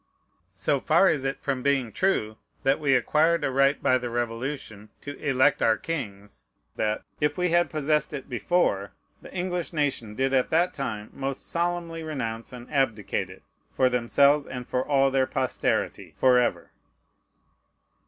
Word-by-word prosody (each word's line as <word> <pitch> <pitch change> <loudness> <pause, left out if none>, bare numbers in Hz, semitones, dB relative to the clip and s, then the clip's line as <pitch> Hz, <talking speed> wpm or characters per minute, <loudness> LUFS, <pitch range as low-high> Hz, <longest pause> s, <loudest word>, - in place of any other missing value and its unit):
So 120 +9 0
far 165 +8 +4
is 145 -7 +1
it 135 - -2
from 135 -2 -2
being 135 -4 +1
true 110 - 0 0.3
that 135 +2 +2
we 140 -3 +3
acquired 155 +6 +2
a 135 - 0
right 135 +2 +3
by 130 - +4
the 120 -1 -4
Revolution 115 -2 -4
to 145 0 -7
elect 135 0 +3
our 110 -1 +3
kings, 105 -11 -6 0.3
that, 105 0 -1 0.2
if 150 +3 0
we 180 0 +1
had 175 +1 +3
possessed 150 -1 0
it 140 -3 -6
before, 120 - 0 0.3
the - - -12
English 180 -1 -3
nation 135 -8 -1
did 135 +2 0
at 130 -1 +2
that 170 +3 +2
time 110 -6 -5
most 135 0 -4
solemnly 170 -1 -2
renounce 115 -8 -4
and 125 -1 -10
abdicate 115 -7 0
it, - - -13 0.3
for 130 - +3
themselves, 140 +4 +3
and 125 -1 -6
for 125 - 0
all 135 -1 +2
their 130 -1 +2
posterity - - -1
forever. 125 -2 +2
135 Hz, 155 wpm, -26 LUFS, 120-150 Hz, 0.3 s, far